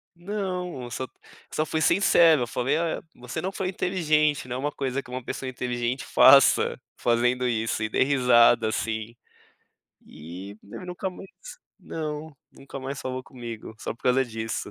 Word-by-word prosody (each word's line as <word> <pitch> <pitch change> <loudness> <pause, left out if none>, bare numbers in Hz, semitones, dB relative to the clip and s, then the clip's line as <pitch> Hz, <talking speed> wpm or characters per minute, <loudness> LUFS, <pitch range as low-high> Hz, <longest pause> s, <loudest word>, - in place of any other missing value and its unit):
Não, 180 -7 -4
só 130 +4 -4 0.4
só 155 - 0
fui 160 0 -2
sincero, 165 -5 +5
eu - - -3
falei: 130 +5 0
"Ah, 165 0 -1
você 125 0 -6
não 190 - -2
foi 190 -1 -3
inteligente, 155 -7 +1
não 125 0 -3
é - - -4
uma 145 +2 -1
coisa 135 -1 -2
que 125 - -17
uma 130 0 -5
pessoa 130 +2 -4
inteligente 125 0 -2
faça, - - +6 0.2
fazendo 125 +1 +1
isso." 115 -2 -1
E 110 - -1
dei - - +3
risada 120 -4 +5
assim. 110 +1 -3 0.9
E 90 +6 -9
nunca 180 - -6
mais 190 +1 -10 0.5
não, 155 -2 -6 0.2
nunca 135 0 -10
mais 135 0 -5
falou 130 0 -4
comigo, 120 -4 -8
só - - -4
por 115 - -28
causa 125 +1 +3
disso. 115 -1 -4
130 Hz, 160 wpm, -26 LUFS, 120-155 Hz, 0.9 s, faça